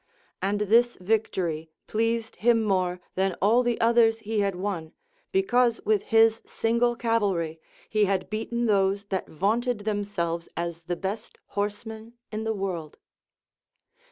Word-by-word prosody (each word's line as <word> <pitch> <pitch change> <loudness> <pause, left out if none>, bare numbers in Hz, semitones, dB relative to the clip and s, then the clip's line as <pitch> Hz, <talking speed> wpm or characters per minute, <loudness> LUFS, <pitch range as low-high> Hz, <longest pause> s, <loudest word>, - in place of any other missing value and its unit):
And 200 +2 0
this 235 +4 +4
victory 180 -6 -1 0.2
pleased 230 +1 -1
him 230 0 +3
more 185 -3 +1
than 190 -1 0
all 220 +6 +4
the 240 -2 0
others 230 -1 +4
he 220 -1 -2
had 200 -2 +1
won, 180 -4 -4 0.4
because 250 - +3
with 210 -2 +2
his 225 0 +4
single 235 +1 +1
cavalry 200 -9 0 0.3
he 215 -1 +2
had 195 -1 0
beaten 235 +2 -2
those 200 -2 +2
that 190 -1 -2
vaunted 220 - 0
themselves 200 -5 -2
as 170 -1 -3
the 175 - -1
best 195 +5 -5
horsemen 220 +2 -4 0.2
in 215 +1 -3
the 220 - 0
world. 180 -6 -4
210 Hz, 135 wpm, -26 LUFS, 190-225 Hz, 0.4 s, this